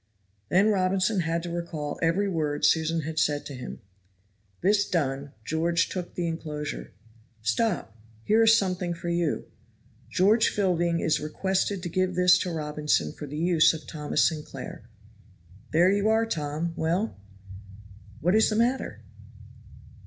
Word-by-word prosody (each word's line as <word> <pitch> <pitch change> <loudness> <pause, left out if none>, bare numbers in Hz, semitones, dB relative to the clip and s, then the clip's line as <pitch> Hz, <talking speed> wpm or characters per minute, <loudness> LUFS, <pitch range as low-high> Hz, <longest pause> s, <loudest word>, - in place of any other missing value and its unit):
Then 195 +4 +4
Robinson 190 +1 +1
had 165 0 -1
to 175 - -5
recall 165 -4 -4
every 170 +5 +2
word 155 -5 -1
Susan 160 0 +2
had 155 +1 -3
said 145 -2 +1
to 145 - -7
him; 125 -1 -8 0.8
this 200 +2 +3
done, 140 -4 -1
George 170 +1 +1
took 180 -2 -5
the 175 - -1
inclosure. 155 -3 -5 0.5
"Stop, 145 - 0 0.3
here 220 - +3
is 225 0 +6
something 180 -3 -1
for 170 +1 -5
you: 170 -2 0 0.6
'George 210 +5 +4
Fielding 175 -4 +1
is 160 - +1
requested 190 +4 -1
to - - -2
give 185 +1 0
this 180 0 +5
to 180 - -2
Robinson 150 - -1
for 150 - -8
the 150 +2 -6
use 165 -1 +4
of 160 - -9
Thomas 150 -2 0
Sinclair.' 140 -7 -7 0.8
There 175 +4 +4
you 205 +2 +2
are, 225 +1 +3
Tom 160 -3 -3
well! 175 +8 -1 1.1
what 180 +4 +2
is 220 +1 +4
the 215 - -1
matter?" 240 +4 0
170 Hz, 145 wpm, -27 LUFS, 155-190 Hz, 1.1 s, is